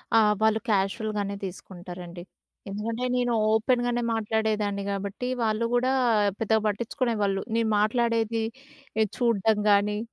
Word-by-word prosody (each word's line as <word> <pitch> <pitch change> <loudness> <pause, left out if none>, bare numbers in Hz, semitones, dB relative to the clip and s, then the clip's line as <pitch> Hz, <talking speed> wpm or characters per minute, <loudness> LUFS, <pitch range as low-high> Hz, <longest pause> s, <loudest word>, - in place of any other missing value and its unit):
ఆ! 225 - +8 0.2
వాళ్ళు 220 0 +3
క్యాజువల్‍‌ 215 +2 0
గానే 200 0 -2
తీసుకుంటారండి. 175 -1 -9 0.5
ఎందుకంటే 225 +5 -3
నేను 245 -1 +1 0.2
ఓపెన్‍ 240 +3 +2
గానే 240 0 0
మాట్లాడేదాన్ని 215 -2 -1
కాబట్టి 200 +4 -4 0.2
వాళ్ళు 220 +1 +1
కూడా 255 +2 +2 0.5
పెద్దగా 220 0 +2
పట్టించుకునేవాళ్ళు. 210 -2 -1
నేను 230 -1 +1
మాట్లాడేదీ 230 0 +1 0.7
చూడ్డం 225 -3 +2
కానీ, 205 +1 +3
220 Hz, 115 wpm, -26 LUFS, 200-230 Hz, 0.7 s, ఆ